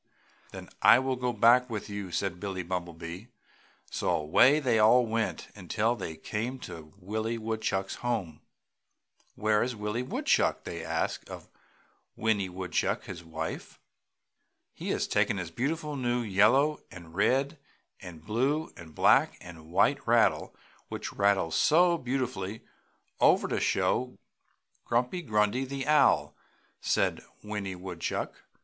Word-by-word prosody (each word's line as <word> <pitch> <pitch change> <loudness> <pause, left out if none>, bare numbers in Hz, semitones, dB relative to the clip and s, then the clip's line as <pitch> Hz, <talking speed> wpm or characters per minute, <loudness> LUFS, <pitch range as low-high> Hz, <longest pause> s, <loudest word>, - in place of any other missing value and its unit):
"Then - - -9
I - - +8
will 130 0 0
go 125 -1 -1
back 120 +3 +4
with 110 -3 -4
you!" 100 -3 -6
said 90 0 -2
Billie 95 -2 -4
Bumblebee, 85 +2 -6 0.6
so - - -2
away 125 - +4
they 120 -6 +2
all 120 +3 +6
went 115 0 -2
until 105 +5 -1
they 85 -7 -6
came 115 +10 -4
to 80 -2 -9
Willie 110 +4 -3
Woodchuck's 110 -3 -2
home. 110 -11 -3 0.9
"Where 110 0 +2
is 125 0 -1
Willie 105 +3 -3
Woodchuck?" 125 - +1
they - - -6
asked - - -2
of - - -10 0.6
Winnie 105 -4 0
Woodchuck, 90 0 -2
his 85 -2 -8
wife. 80 -1 -6 0.9
"He - - -6
has - - 0
taken - - +1
his 90 -3 -5
beautiful 150 - -2
new 120 -2 0
yellow 115 +9 +3
and 85 -3 -12
red 135 - +1 0.4
and 85 -4 -11
blue 135 +9 0
and 80 -3 -13
black - - +4
and 80 -2 -12
white 95 - +2
rattle, - - +2 0.3
which - - -5
rattles 100 -5 +2
so 170 +2 +4
beautifully, 120 -6 -3 0.6
over - - +4
to - - -1
show 125 - +1
to - - -24 0.7
Grumpy 125 +9 0
Grundy, 105 -2 +1
the 135 0 -4
Owl!" 150 -2 +3 0.5
said - - +1 0.2
Winnie 105 -3 -4
Woodchuck. 90 -2 -5
110 Hz, 135 wpm, -29 LUFS, 95-125 Hz, 0.9 s, I